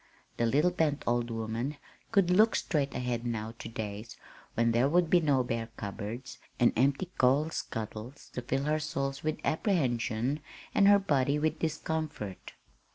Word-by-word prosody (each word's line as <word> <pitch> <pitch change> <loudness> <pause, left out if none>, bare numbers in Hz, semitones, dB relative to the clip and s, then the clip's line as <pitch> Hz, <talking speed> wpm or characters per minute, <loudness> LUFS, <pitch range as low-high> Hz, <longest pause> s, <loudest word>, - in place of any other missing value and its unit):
The 120 - +2
little 150 +9 +3
bent 155 -4 0
old 120 0 +1
woman 115 +5 -3 0.3
could 195 -5 +4
look 215 +5 +5
straight 140 -5 0
ahead 125 -1 -2
now 115 -2 -3
to - - -6
days 110 0 -6 0.4
when 115 0 +3
there 120 +4 +3
would 170 0 +3
be 180 - +7
no 145 -5 +2
bare 115 -1 -3
cupboards 110 +5 -6 0.2
and 120 - +5
empty 140 - +1
coal 140 +5 +4
scuttles 110 +3 -6
to 125 - -3
fill 135 +3 -1
her 155 +1 +1
soul 140 -3 -2
with 155 0 -1
apprehension, 135 - 0 0.3
and 200 - +5
her 205 0 +8
body 145 -7 +1
with 155 +1 0
discomfort. 155 - -3
135 Hz, 160 wpm, -30 LUFS, 115-155 Hz, 0.4 s, her